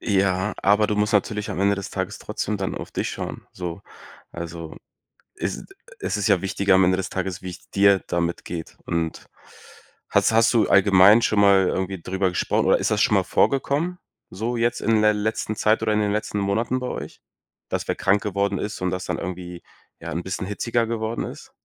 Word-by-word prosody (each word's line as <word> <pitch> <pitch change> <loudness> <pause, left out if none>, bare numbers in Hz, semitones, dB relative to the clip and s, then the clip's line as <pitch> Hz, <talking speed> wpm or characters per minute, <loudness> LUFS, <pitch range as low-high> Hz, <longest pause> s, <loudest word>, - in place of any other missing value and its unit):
Ja, 95 -1 +1
aber 105 +2 +4
du 105 - -1
musst 105 +2 +1
natürlich 105 0 0
am - - -3
Ende 100 +1 +3
des 100 - -6
Tages - - -4
trotzdem 105 0 -3
dann 95 -1 -3
auf - - -7
dich - - -2
schauen, - - -6
so. 90 0 -6 0.5
Also, 85 -1 -7 0.6
es 95 - -4 0.3
es - - -2
ist 105 +1 0
ja 95 -3 +3
wichtiger 100 0 +1
am 95 0 +5
Ende 95 +1 +3
des 95 - -3
Tages, 95 0 -3
wie 95 - -5
es 90 - -12
dir 100 -1 +4
damit 85 0 -2
geht. 85 -2 -7
Und 80 -2 -3 0.8
hast - - +3
hast 115 0 +4
du 115 - +3
allgemein 100 +3 +6
schon 105 -2 +2
mal 100 -2 +5
irgendwie 95 0 -2
drüber 95 +2 0
gesprochen, 90 - 0
oder - - +4
ist - - 0
das - - +1
schon - - +3
mal - - +3
vorgekommen 145 +6 +1 0.4
so 115 +5 -2
jetzt 120 +1 0
in 110 0 +2
ler 105 0 +5
letzten 110 0 -2
Zeit 110 +2 +2
oder 110 -1 +1
in 105 - +2
den 105 -1 +1
letzten 105 -1 -2
Monaten 110 +6 0
bei 125 - -4
euch, - - -7 0.5
dass - - -3
wer - - 0
krank 100 +1 +2
geworden 100 -1 -1
ist 105 +1 -5
und 90 - 0
dass 95 0 -3
dann - - -2
irgendwie, 90 -1 -6 0.4
ja, - - -6
'n 85 +3 -3
bisschen 95 0 -4
hitziger 115 +3 -1
geworden 115 0 -2
ist? - - -9
100 Hz, 205 wpm, -23 LUFS, 95-110 Hz, 0.8 s, allgemein